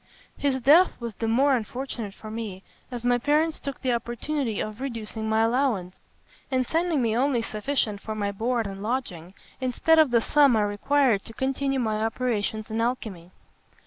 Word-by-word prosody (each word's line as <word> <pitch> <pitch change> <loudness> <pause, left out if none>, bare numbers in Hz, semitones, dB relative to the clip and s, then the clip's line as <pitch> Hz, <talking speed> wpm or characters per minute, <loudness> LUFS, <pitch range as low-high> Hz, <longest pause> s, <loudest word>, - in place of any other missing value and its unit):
His 275 -2 0
death 310 +9 +5
was 235 -2 -5
the 225 +3 -3
more 265 +5 +4
unfortunate 235 -3 -5
for 215 - -9
me, 215 -4 -6 0.3
as 245 -2 -6
my 245 0 +3
parents 305 +5 +1
took 280 -1 -6
the 255 -2 +2
opportunity 240 +1 -2
of 215 +3 -5
reducing 225 -4 -4
my 220 0 +3
allowance, 225 -7 0 0.6
and 255 -2 +1
sending 325 -2 +1
me 225 -1 +1
only 250 -1 +1
sufficient 215 -2 -1
for 220 - -5
my 205 -1 -1
board 230 +3 -1
and 195 -1 -6
lodging, 200 -7 -4 0.2
instead 270 +5 +3
of 310 -3 +6
the 240 -1 +4
sum 280 +1 +4
I 215 - +3
required 215 +2 +2
to 225 - -10
continue 270 +2 -1
my 215 -3 0
operations 220 -2 -2
in 225 +1 -1
alchymy. 220 -8 -3
235 Hz, 175 wpm, -26 LUFS, 215-270 Hz, 0.6 s, of